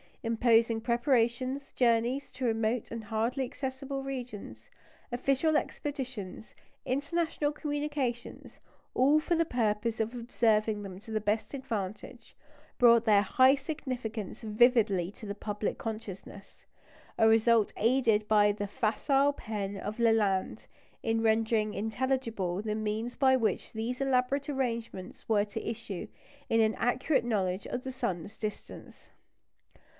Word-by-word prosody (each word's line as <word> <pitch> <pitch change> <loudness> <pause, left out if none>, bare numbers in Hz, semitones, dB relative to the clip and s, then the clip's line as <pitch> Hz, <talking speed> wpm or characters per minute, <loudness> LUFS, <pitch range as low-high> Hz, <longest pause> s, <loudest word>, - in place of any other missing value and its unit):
Imposing 230 0 +3
preparations, 250 +2 0
journeys 240 +3 +1
to 255 0 -4
remote 225 0 0
and 230 -1 -5
hardly 225 +5 -1
accessible 270 +1 -4
regions, 225 - -7 0.4
official 275 +5 +1
expeditions, 255 -11 -5 0.3
international 295 +2 0
communications, 290 -5 -4 0.4
all 285 +4 +5
for 340 +3 0
the 330 0 +2
purpose 225 -4 0
of 220 +2 -1
observing 220 -3 +1
them 190 -2 -8
to 225 +2 -12
the 215 -1 0
best 210 +5 -1
advantage, 215 -7 -6 0.4
brought 235 -1 +6
their 210 -3 +5
high 260 +7 +5
significance 255 - -5
vividly 215 -5 +3
to 215 - -12
the 200 - -4
public 210 0 -3
consciousness; 200 -3 -8 0.5
a 225 - +5
result 225 -1 +4
aided 225 -3 +2
by 210 -1 +5
the 205 0 -4
facile 270 +7 +1
pen 205 -6 -4
of 210 +3 -5
Lalande, 215 -5 +2 0.4
in 225 0 +1
rendering 220 -1 +2
intelligible 225 -5 -1
the 215 0 -2
means 215 +3 -2
by 265 -1 +4
which 230 -4 -1
these 230 +4 -3
elaborate 270 +1 +1
arrangements 235 -8 -4
were 210 -2 +3
to 210 +1 -6
issue 225 -5 -5 0.4
in 225 - +3
an 220 0 +4
accurate 250 +3 +1
knowledge 195 -4 -1
of 245 - -4
the 265 - -4
sun's 200 -6 -4
distance. 215 -1 -7
230 Hz, 125 wpm, -30 LUFS, 215-260 Hz, 0.5 s, brought